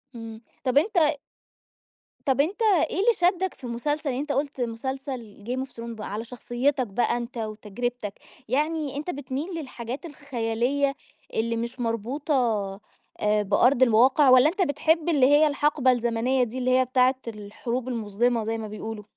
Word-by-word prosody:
إمم. 225 -1 -8 0.2
طب، 255 +1 +2
أنت 355 +6 +2 1.3
طب 275 -1 +3
أنت 385 +9 -2 0.3
إيه - - -5
اللي 470 +4 +4
شدّك 365 +1 +2
في - - -24
المسلسل؟ 250 +5 -2
يعني 250 - -2
أنت 295 0 -3
قُلت 280 -1 -2
مسلسل 240 -2 -5
Game 260 +2 -2
of - - -23
Thrones 230 0 -7
بقى 210 -1 -6
على 220 +2 -3
شخصيّتك 250 +2 -1
بقى 235 +4 0
أنت، 240 +1 -6
وتجرّبتك، 215 +1 -4 0.4
يعني 295 +1 0
أنت 305 +5 -4
بتميل 285 +4 -4
للحاجات 255 +1 -6
الخيالية 275 -1 -1 0.4
اللي 230 +1 0
مش 235 +2 -4
مربوطة 245 +6 -2 0.9
آآ، 210 0 +2
بأرض 245 +6 +3
الواقع 260 +4 +5
والّا 255 +4 +7
أنت 385 +3 -3
بتحب 320 +1 +2
اللي 285 -6 +4
هي 295 +2 +6
الحَقبة 285 -2 +2
الزمنية 240 +2 +1
دي 240 +2 -4
اللي 255 0 0
هي 255 - +3
بتاعة 255 +1 +3
الحروب 230 +3 -4
المُظلمة 230 0 0
زي 225 +1 -2
ما 220 -1 -5
بيقولوا؟ 215 0 -6
255 Hz, 155 wpm, -26 LUFS, 230-285 Hz, 1.3 s, والّا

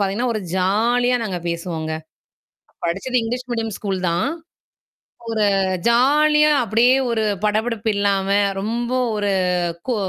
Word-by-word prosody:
பார்த்தீங்கன்னா, 205 +5 0
ஒரு 215 - -2 0.2
ஜாலியா 235 +6 +2
நாங்க 190 -5 -3
பேசுவோங்க. 165 -2 -4 0.9
படிச்சது 195 +9 -1
இங்கிலீஷ் 245 +2 -4
மீடியம் 225 -2 -2
ஸ்கூல் 195 -3 -3
தான். 170 +9 0 1.0
ஒரு 215 -2 +1 0.4
ஜாலியா 300 +5 +4
அப்பிடியே 230 +4 +3 0.2
ஒரு 225 -2 0 0.2
படப்படப்பு 220 +1 0
இல்லாம, 200 -1 +1 0.3
ரொம்ப 235 +4 -2 0.2
ஒரு 205 -1 0 0.6
கூ 250 - +1
220 Hz, 115 wpm, -20 LUFS, 195-245 Hz, 1.0 s, ஜாலியா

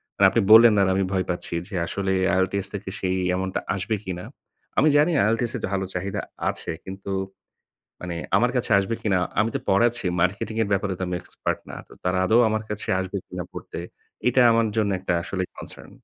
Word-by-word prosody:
মানে 100 - +4
আপনি 115 - +2
বললেন 115 0 +9
আর 95 - +3
আমি 95 - +1
ভয় 95 -1 +1
পাচ্ছি 85 -1 -3
যে 105 - -7
আসলে 95 -1 -1 0.2
IELTS 95 +1 0
থেকে 100 -1 -5
সেই 95 0 0 0.2
amount 95 0 -2
টা - - 0
আসবে 100 +3 -1
কিনা? 90 -1 -5 0.5
আমি 155 - +5
জানি 150 +4 +4
IELTS 115 +2 +1
এ - - 0
যে - - 0
ভালো 95 0 0
চাহিদা 95 +2 -3 0.3
আছে - - -3
কিন্তু, 95 +1 -7 0.9
মানে 90 -2 -5 0.2
আমার 120 +1 +3
কাছে 120 - -1
আসবে 100 +3 -1
কিনা? 95 -4 +2 0.2
আমি 110 +2 +2
তো - - -3
পড়াচ্ছি 115 +1 +2
marketing 100 +5 -1
এর 100 - -1
ব্যাপারে 100 0 0
তো - - -5
আমি 90 - -2
expert - - -3
না - - -7
তো - - -17
তারা 90 0 +1
আদৌ 110 +5 +4
আমার 110 0 -1
কাছে 105 0 -4
আসবে 95 +1 -4
কিনা 90 -1 -5
পড়তে? - - -7 0.5
এটা 125 +1 +3
আমার 115 0 +3
জন্য 105 -2 +2
১টা 90 - -1
আসলেই 95 +1 -3
concern. - - -9
100 Hz, 200 wpm, -24 LUFS, 95-110 Hz, 0.9 s, বললেন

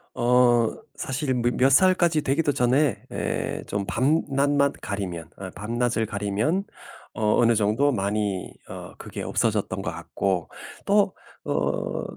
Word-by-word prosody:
어 120 -1 +4 0.3
사실은 130 -2 -2
몇 120 +1 +1
몇 130 +2 +4
살까지 175 +1 +4
되기도 145 +2 +1
전에 130 +2 +2
예 - - -3
좀 100 -1 -2
밤낮만 140 +1 +2
가리면 90 -6 -5
어 95 -1 -7
밤낮을 115 +1 -1
가리면 105 - -1 0.5
어 105 -2 +1
어느 115 0 +4
정도 110 +7 +2
많이 100 -3 -2 0.2
어 - - -8
그게 - - -7
없어졌던 - - -1
것 - - -3
같고 95 -3 -2 0.4
또 200 -1 +3 0.4
어 - - -1
120 Hz, 235 characters per minute, -25 LUFS, 105-140 Hz, 0.5 s, 어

